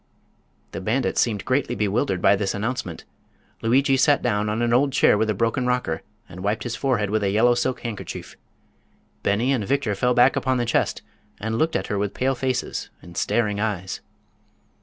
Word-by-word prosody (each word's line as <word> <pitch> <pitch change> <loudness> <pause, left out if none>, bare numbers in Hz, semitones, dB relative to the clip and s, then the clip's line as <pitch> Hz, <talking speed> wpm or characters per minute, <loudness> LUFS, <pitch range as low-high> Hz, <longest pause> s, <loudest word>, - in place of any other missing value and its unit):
The - - -5
bandits 115 +8 +1
seemed 105 -5 -1
greatly 130 +1 0
bewildered 100 -3 0
by 100 - +6
this 100 -1 -1
announcement. 105 -5 -4 0.6
Lugui 135 +4 +3
sat 145 +2 +4
down 105 +1 0
on 110 +3 -1
an 120 0 +1
old 135 +3 +3
chair 135 - +4
with 110 +1 +1
a 105 - +1
broken 115 +4 0
rocker 125 -11 -1 0.3
and 90 - -11
wiped 105 +4 -1
his 120 -2 -3
forehead 115 -7 0
with 110 0 +1
a 100 - +1
yellow 115 +5 +4
silk 125 +1 -1
handkerchief. 115 -4 -6 0.9
Beni 110 +7 +1
and 120 -6 0
Victor 135 -1 0
fell 125 +5 +1
back 125 +2 +5
upon 130 -1 +1
the 120 - 0
chest 120 - 0 0.4
and 110 +3 -2
looked 160 +1 +1
at - - 0
her 105 - -2
with 100 -1 -2
pale 135 +1 +1
faces 130 0 -2
and 85 0 -12
staring 105 -1 0
eyes. 95 -3 -3
115 Hz, 185 wpm, -23 LUFS, 100-125 Hz, 0.9 s, by